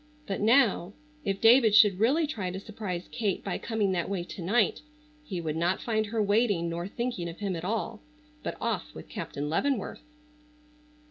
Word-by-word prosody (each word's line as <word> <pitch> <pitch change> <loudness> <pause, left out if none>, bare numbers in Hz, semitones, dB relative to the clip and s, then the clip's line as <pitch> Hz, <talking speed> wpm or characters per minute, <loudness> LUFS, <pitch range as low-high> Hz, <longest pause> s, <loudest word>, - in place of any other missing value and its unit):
But 195 - -3
now, 220 -5 +3 0.3
if 195 -1 -1
David 225 -2 +6
should 200 -4 +6
really 280 +9 +3
try 215 -11 -3
to 185 +1 -5
surprise 195 -4 -5
Kate 210 -5 -1
by 195 - -3
coming 215 -4 0
that 180 -1 -1
way 190 -3 -2
to 185 - -8
night 210 +6 +2 0.4
he 195 -11 -4
would 155 -2 -3
not 175 +3 +1
find 220 -2 0
her 220 0 0
waiting 205 -5 +2
nor 170 +2 -3
thinking 235 -6 -3
of 165 - -9
him 200 -3 -2
at 165 - -5
all, 220 +4 -2 0.4
but - - -4
off - - -3
with - - -9
Captain 145 +1 -4
Leavenworth. 235 - -1
200 Hz, 180 wpm, -28 LUFS, 180-225 Hz, 0.4 s, David